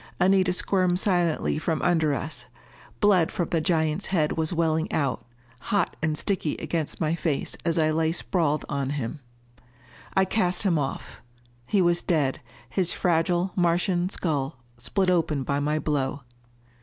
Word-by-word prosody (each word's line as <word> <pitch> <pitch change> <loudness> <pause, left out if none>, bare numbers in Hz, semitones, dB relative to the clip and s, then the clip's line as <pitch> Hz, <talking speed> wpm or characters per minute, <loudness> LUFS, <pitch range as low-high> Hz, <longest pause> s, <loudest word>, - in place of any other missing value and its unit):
Anita 185 0 +4
squirmed 180 -1 +1
silently 175 -6 +1
from 160 0 -1
under 160 -5 +2
us. 135 -4 -5 0.5
Blood 190 -5 +4
from 175 - -2
the 165 - +1
giant's 160 +2 +1
head 155 -5 +1
was 160 -1 -1
welling 160 -2 0
out, 140 -4 -1 0.4
hot 205 -3 0
and 155 -1 +1
sticky 185 -5 -1
against 160 -3 -3
my 155 -1 +1
face 165 -4 -2
as 165 -1 0
I 155 -1 +3
lay 160 0 +1
sprawled 165 -3 -1
on 140 -2 -2
him. 135 +3 -4 1.0
I 190 - +4
cast 185 -2 0
him 175 -6 +2
off. 135 -1 -5 0.5
He 200 -3 +3
was 175 0 +3
dead, 145 -6 0 0.3
his 175 +6 +1
fragile 175 +1 +1
Martian 175 +1 +1
skull 145 -9 -2 0.2
split 185 - +1
open 160 -5 +1
by 140 +2 -1
my 150 +2 0
blow. 145 -2 -1
165 Hz, 150 wpm, -26 LUFS, 150-180 Hz, 1.0 s, Anita